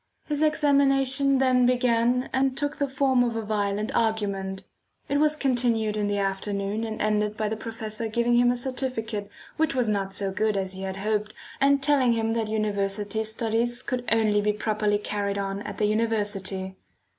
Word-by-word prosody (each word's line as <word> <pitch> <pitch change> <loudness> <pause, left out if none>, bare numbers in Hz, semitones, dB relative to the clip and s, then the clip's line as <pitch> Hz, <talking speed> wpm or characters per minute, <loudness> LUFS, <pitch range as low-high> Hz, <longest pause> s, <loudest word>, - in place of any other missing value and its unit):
His 295 -1 -2
examination 275 -3 +3
then 255 -2 +3
began 245 0 +2
and 265 0 +1
took 290 +1 -2
the 285 - 0
form 265 -2 +2
of 235 -2 -1
a 225 - -2
violent 210 0 -1
argument. 200 -4 -1 0.4
It 285 - +1
was 305 0 +3
continued 240 -6 +1
in 210 -1 0
the 205 0 0
afternoon 200 +2 -2
and 220 -1 -4
ended 210 0 0
by 215 -1 -1
the 220 - -2
professor 225 0 -5
giving 235 +2 +1
him 245 0 +5
a 245 - +1
certificate 240 -5 -3 0.3
which 320 -3 +1
was 250 -3 +1
not 200 -2 -1
so 195 0 -2
good 210 +1 0
as 190 -1 -2
he 190 - -7
had 190 0 -4
hoped, 210 +1 -2 0.2
and 280 0 +3
telling 275 -4 +3
him 225 0 0
that 225 -2 -1
university 210 0 -1
studies 230 +2 -1
could 250 -1 -2
only 215 -2 +3
be 210 0 +1
properly 210 -1 0
carried 205 -1 -3
on 195 0 -3
at 205 -1 -7
the 210 - +1
university. 205 -3 -1
220 Hz, 180 wpm, -26 LUFS, 205-250 Hz, 0.4 s, him